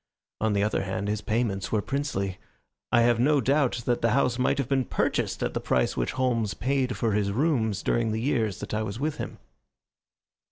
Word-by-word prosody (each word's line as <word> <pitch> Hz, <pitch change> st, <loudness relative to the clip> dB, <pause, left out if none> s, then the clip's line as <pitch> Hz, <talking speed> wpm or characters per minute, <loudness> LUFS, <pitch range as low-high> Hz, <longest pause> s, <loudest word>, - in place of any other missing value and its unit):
On 110 Hz, -1 st, +1 dB
the 100 Hz, 0 st, +2 dB
other 105 Hz, -, 0 dB
hand, 95 Hz, +1 st, -3 dB
his 105 Hz, 0 st, -1 dB
payments 105 Hz, -3 st, -1 dB
were 110 Hz, -, +2 dB
princely. 105 Hz, -7 st, -2 dB, 0.5 s
I 120 Hz, -, +5 dB
have 120 Hz, 0 st, +3 dB
no 145 Hz, +4 st, +4 dB
doubt 135 Hz, -3 st, +1 dB
that 120 Hz, -1 st, +1 dB
the 115 Hz, -, +3 dB
house 125 Hz, -3 st, +1 dB
might 130 Hz, +1 st, +2 dB
have 140 Hz, -4 st, -1 dB
been 135 Hz, -1 st, +2 dB
purchased -, -, -1 dB
at -, -, -1 dB
the -, -, -1 dB
price 60 Hz, -1 st, +1 dB
which -, -, -1 dB
Holmes 120 Hz, -5 st, 0 dB
paid 130 Hz, -1 st, 0 dB
for 115 Hz, -, +1 dB
his 100 Hz, -1 st, +1 dB
rooms 110 Hz, -, +1 dB
during 115 Hz, -2 st, +1 dB
the 110 Hz, -, -1 dB
years 115 Hz, -, 0 dB
that -, -, -6 dB
I 110 Hz, -, 0 dB
was 110 Hz, +1 st, -4 dB
with 150 Hz, +1 st, -1 dB
him. -, -, -5 dB
115 Hz, 205 wpm, -27 LUFS, 105-130 Hz, 0.5 s, I